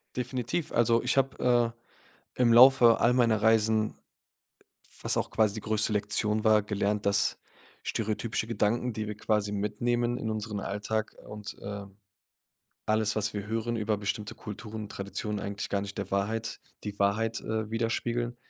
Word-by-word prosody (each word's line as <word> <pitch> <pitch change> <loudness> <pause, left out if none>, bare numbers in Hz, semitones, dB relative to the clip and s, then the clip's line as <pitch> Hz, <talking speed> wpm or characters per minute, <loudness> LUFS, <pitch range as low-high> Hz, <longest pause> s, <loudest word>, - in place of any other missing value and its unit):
Definitiv. 125 +5 -2
Also 115 0 +3
ich 125 +2 0
habe, 125 -3 +2
äh, 115 0 -33 0.4
im 115 -1 +5
Laufe 120 -1 +7
all 120 - +4
meiner 115 -4 +3
Reisen, 110 -1 +3 1.0
was - - +1
auch - - -1
quasi 110 -3 +2
die 110 - -4
größte 110 +1 +1
Lektion 105 +1 +1
war, 110 -1 +5
gelernt, 105 0 -1
dass 100 0 +2 0.4
stereotypische 110 0 -2
Gedanken, 115 +2 0
die 110 -1 -4
wir 105 - -5
quasi 105 -1 0
mitnehmen 120 +4 0
in 110 - -3
unseren 105 -1 -3
Alltag 105 +2 -3
und, 105 0 -8
äh, 100 0 -6 1.0
alles, 110 0 +1
was 105 -1 0
wir 100 0 -4
hören 115 +1 -1
über 110 0 0
bestimmte 105 +1 -3
Kulturen, 105 0 -7
Traditionen, 100 +1 -4
eigentlich 100 +1 -4
gar 100 - 0
nicht 100 0 -7
der 100 -1 -4
Wahrheit 110 +3 -1 0.2
die 100 -1 -5
Wahrheit, 110 +3 +1
äh, 110 -1 -3
widerspiegeln. 120 +1 -1
110 Hz, 150 wpm, -29 LUFS, 105-115 Hz, 1.0 s, Laufe